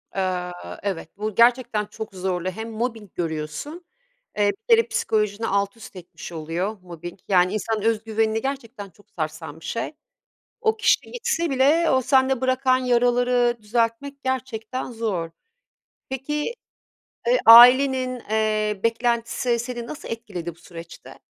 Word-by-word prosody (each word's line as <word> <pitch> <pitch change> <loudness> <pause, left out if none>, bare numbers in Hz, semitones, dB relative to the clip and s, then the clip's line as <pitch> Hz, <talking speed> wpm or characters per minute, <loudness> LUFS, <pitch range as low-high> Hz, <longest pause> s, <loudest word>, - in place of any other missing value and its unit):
Eee, 180 -2 -1 0.3
evet 190 -5 -3
bu 215 -1 -4
gerçekten 235 -3 +3
çok 215 -1 -8
zorlu 185 -1 -2
hem 220 +4 -6
mobbing 225 -3 -4
görüyorsun, 165 - -5 0.5
eee, 205 -1 +3 0.2
bir 460 - +9
kere 460 - +1
psikolojini 215 +1 -1
alt 200 +2 0
üst 210 - -12
etmiş 175 -1 -10
oluyor 170 +6 -3
mobbing, 175 0 -9
yani, 185 0 +3
insanın 215 0 -2
özgüvenini 220 0 0
gerçekten 240 -6 -5
çok 205 +3 -25
sarsan 155 -1 -5
bir - - -13
şey. 230 +4 -3 0.7
O 440 -1 +1
kişi 460 +2 +2
gitse 470 -9 -1
bile 290 +6 +3
o 260 0 +3
sende 265 0 +2
bırakan 260 0 +2
yaraları 245 -1 +2
düzeltmek, 235 +6 -2
gerçekten 255 -1 -3
zor. 210 -8 -2 0.8
Peki, 295 - -3 0.7
eee, - - +4
ailenin, 255 +2 +8
eee, 215 -1 0
beklentisi 235 +1 0
seni 240 -1 -5
nasıl 305 - -8
etkiledi 185 -8 -6
bu - - -24
süreçte? 170 -1 -12
225 Hz, 130 wpm, -23 LUFS, 195-255 Hz, 0.8 s, bir